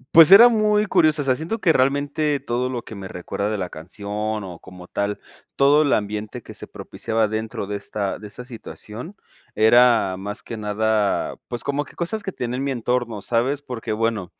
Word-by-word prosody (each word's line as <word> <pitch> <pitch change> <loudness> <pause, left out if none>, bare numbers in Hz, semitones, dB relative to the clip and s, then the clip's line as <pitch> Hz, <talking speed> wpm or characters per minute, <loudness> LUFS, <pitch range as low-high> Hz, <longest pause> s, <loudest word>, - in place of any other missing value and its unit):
Pues 165 -1 +10
era 225 +5 +11
muy 215 -2 +2
curiosa, 155 -6 +3
o - - -6
sea, 130 -1 +3
siento 160 - -3
que 175 -6 +3
realmente 145 +2 +1
todo 125 +2 -2
lo 125 -2 -4
que - - -10
me 100 -2 -7
recuerda 95 +3 -4
de 110 - -2
la 90 -2 -4
canción, 105 +5 -4
o, 90 -3 -8
como 90 -1 -12
tal 100 +2 -2 0.4
todo 145 +2 +5
el 145 - +2
ambiente 105 0 -2
que - - -10
se - - -7
propiciaba 115 -1 -2
dentro 110 -1 -4
de 100 +1 -3
esta 100 -1 -3
de 105 - -9
esta 115 +4 -8
situación 120 - -9 0.4
era 115 -3 +5
más 105 +4 -6
que 115 - -6
nada, 105 -1 0
pues, 120 -1 -5
como 140 +1 -1
que - - -17
cosas 195 +6 -3
que 195 - -4
tenía 125 -4 -4
en 135 - -2
mi 140 - -1
entorno, 120 -3 -2
¿sabes? 130 +5 0
Porque 125 -5 -5
bueno, 110 -4 -1
115 Hz, 200 wpm, -22 LUFS, 105-140 Hz, 0.4 s, era